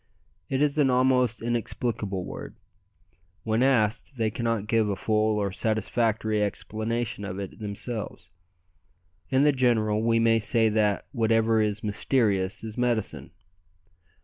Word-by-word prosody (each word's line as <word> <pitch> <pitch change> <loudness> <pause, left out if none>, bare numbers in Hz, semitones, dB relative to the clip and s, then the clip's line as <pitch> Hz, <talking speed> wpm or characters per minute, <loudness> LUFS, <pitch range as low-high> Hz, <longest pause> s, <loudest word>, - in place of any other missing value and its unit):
It 135 +2 +1
is 150 0 +1
an 140 -3 +4
almost 125 -2 +2
inexplicable 115 -4 -2
word. - - -8 0.9
When 110 +1 0
asked, 120 -1 +1
they 110 -2 0
cannot 115 -2 -1
give 110 -1 +1
a 100 - -1
full 110 +1 +1
or 100 -2 -1
satisfactory 110 +1 0
explanation 110 +2 -3
of 95 -2 -5
it 100 +1 -7
themselves. 105 -3 -4 1.0
In 130 +1 +3
the 150 - +5
general, 115 -5 +1
we 115 0 +2
may 115 0 +3
say 110 +1 +3
that 105 -2 +1
whatever 115 -2 +2
is 105 -1 -1
mysterious 105 -3 0
is 110 +1 -6
"medicine." 120 -4 -1
110 Hz, 130 wpm, -26 LUFS, 105-120 Hz, 1.0 s, the